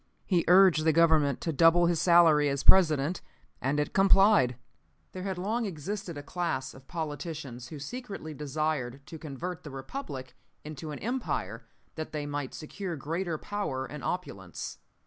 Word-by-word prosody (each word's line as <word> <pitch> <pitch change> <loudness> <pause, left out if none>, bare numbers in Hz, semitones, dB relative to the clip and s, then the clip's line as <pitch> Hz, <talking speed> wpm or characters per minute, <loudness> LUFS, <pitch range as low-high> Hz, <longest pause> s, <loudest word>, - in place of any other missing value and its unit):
He 180 -4 +2
urged 180 -3 +6
the 160 0 +3
Government 155 -4 +3
to 165 - -2
double 165 +4 +5
his 170 -1 +1
salary 165 -4 +6
as 140 0 -2
President, 160 -3 +4 0.4
and 135 +3 0
it 150 - -1
complied. 195 - +5 0.6
"There 185 - -7
had 190 -1 -3
long 215 +5 -1
existed 180 0 -5
a 145 - -6
class 145 -5 -3
of 135 0 -16
politicians 145 -5 -5
who 155 - -8
secretly 195 - -7
desired 145 -3 -3
to 160 - -9
convert 160 +4 -6
the 150 - -9
Republic 135 - -7 0.3
into 155 0 -7
an 150 - -5
Empire, 115 - -3 0.3
that 155 -1 -6
they 150 -1 -3
might 145 -2 -4
secure 175 +3 -5
greater 165 +3 -3
power 150 -10 -3
and 145 +2 -8
opulence. 95 - -5
155 Hz, 155 wpm, -29 LUFS, 140-180 Hz, 0.6 s, urged